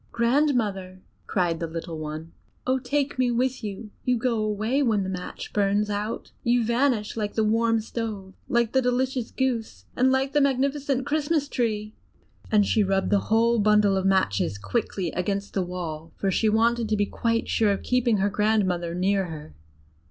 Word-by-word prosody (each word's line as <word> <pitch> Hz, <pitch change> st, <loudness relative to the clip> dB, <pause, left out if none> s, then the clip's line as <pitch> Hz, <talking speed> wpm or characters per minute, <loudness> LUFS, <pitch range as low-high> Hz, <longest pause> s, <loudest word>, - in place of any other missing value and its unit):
"Grandmother!" 230 Hz, -8 st, 0 dB, 0.2 s
cried 175 Hz, -4 st, 0 dB
the 165 Hz, -, -2 dB
little 165 Hz, 0 st, -6 dB
one; 155 Hz, +1 st, -6 dB, 0.3 s
"oh, 260 Hz, +1 st, +1 dB
take 280 Hz, +1 st, -1 dB
me 255 Hz, -1 st, +3 dB
with 250 Hz, +1 st, 0 dB
you! 210 Hz, +1 st, -6 dB
You 250 Hz, -1 st, +2 dB
go 235 Hz, 0 st, 0 dB
away 215 Hz, +6 st, 0 dB
when 220 Hz, -7 st, +2 dB
the 190 Hz, -, -4 dB
match 180 Hz, -1 st, -6 dB
burns 205 Hz, +1 st, +1 dB
out; 210 Hz, +2 st, -4 dB
you 240 Hz, 0 st, +3 dB
vanish 235 Hz, -2 st, +1 dB
like 210 Hz, -2 st, -3 dB
the 220 Hz, -, +2 dB
warm 225 Hz, +1 st, +2 dB
stove, 215 Hz, -4 st, -5 dB, 0.2 s
like 235 Hz, -2 st, +2 dB
the 265 Hz, -, +3 dB
delicious 250 Hz, 0 st, 0 dB
roast -, -, -23 dB
goose, 230 Hz, -, -2 dB
and 260 Hz, +1 st, +3 dB
like 265 Hz, +1 st, +1 dB
the 295 Hz, -, +4 dB
magnificent 275 Hz, 0 st, +1 dB
Christmas 300 Hz, 0 st, 0 dB
tree!" 215 Hz, -5 st, -2 dB, 0.6 s
And 210 Hz, -2 st, +4 dB
she 215 Hz, -, +2 dB
rubbed 195 Hz, 0 st, 0 dB
the 205 Hz, -, +4 dB
whole 230 Hz, +1 st, +3 dB
bundle 210 Hz, -1 st, +4 dB
of 190 Hz, 0 st, +1 dB
matches 105 Hz, -, +1 dB
quickly 130 Hz, -, -2 dB
against 200 Hz, +2 st, -2 dB
the 195 Hz, -, 0 dB
wall, 165 Hz, -3 st, -5 dB
for 195 Hz, -, 0 dB
she 220 Hz, +4 st, +2 dB
wanted 230 Hz, +1 st, +2 dB
to 215 Hz, -, +1 dB
be 205 Hz, -, +2 dB
quite 230 Hz, +2 st, -1 dB
sure 215 Hz, -2 st, +2 dB
of 200 Hz, -, -2 dB
keeping 250 Hz, -3 st, +2 dB
her 200 Hz, +1 st, +1 dB
grandmother 190 Hz, -5 st, +1 dB
near 195 Hz, +2 st, +1 dB
her. 155 Hz, -, -9 dB
215 Hz, 180 wpm, -25 LUFS, 195-245 Hz, 0.6 s, the